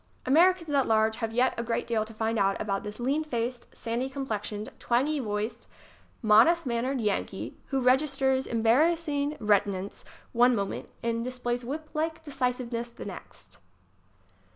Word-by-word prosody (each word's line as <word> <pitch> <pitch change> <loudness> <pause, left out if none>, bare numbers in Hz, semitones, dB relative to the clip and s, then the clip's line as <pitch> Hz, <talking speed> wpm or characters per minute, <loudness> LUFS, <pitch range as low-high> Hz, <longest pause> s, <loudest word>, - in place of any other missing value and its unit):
Americans 335 +3 +4
at 275 -2 +2
large 220 0 +3
have 225 -1 -2
yet 245 +3 +2
a - - -1
great 230 0 -1
deal 230 -2 0
to 220 - -11
find 225 0 -1
out 195 0 +2
about 195 -2 -1
this 210 0 -8
lean 275 +6 0
faced, 240 -3 -3
sandy 240 +3 -2
complexioned, 215 -6 -4
twangy 275 +6 +1
voiced, 215 0 -3 0.6
modest 230 +11 +5
mannered 250 +2 -1
Yankee 205 -3 -2
who 270 - 0
reg 255 +1 +5
isters 265 -3 0
embarrassing 290 +5 +2
reticence 200 -2 0 0.3
one 245 +1 +4
moment 200 -2 -3
and 230 0 -1
dis 255 +1 -5
plays 245 0 -2
whip 300 +6 -5
like 320 +1 -2
decisiveness 250 -4 -2
the 235 - -10
next. 95 - -11
240 Hz, 155 wpm, -28 LUFS, 220-275 Hz, 0.6 s, modest